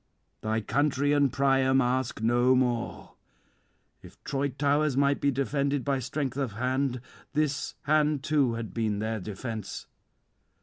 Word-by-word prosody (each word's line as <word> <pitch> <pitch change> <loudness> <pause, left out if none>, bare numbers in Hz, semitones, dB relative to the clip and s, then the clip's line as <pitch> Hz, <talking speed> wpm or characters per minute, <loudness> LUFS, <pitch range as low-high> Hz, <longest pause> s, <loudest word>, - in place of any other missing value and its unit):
Thy 110 +1 -1
country 145 +4 +1
and 145 -2 +3
Priam 135 0 +3
ask 125 -3 0
no 120 +3 +4
more. 120 -2 -1 0.9
If - - -14
Troy 140 +1 -1
towers 145 +1 +1
might 140 0 +2
be 140 - +3
defended 140 0 0
by 140 -2 +1
strength 130 +1 -3
of 135 -6 -2
hand, 125 +2 -1 0.3
this 150 -1 -1
hand 150 -1 +2
too 145 -6 +2
had 115 -5 -6
been 110 -3 -1
their 110 +1 -2
defence. 110 +2 -6
135 Hz, 135 wpm, -28 LUFS, 120-140 Hz, 0.9 s, no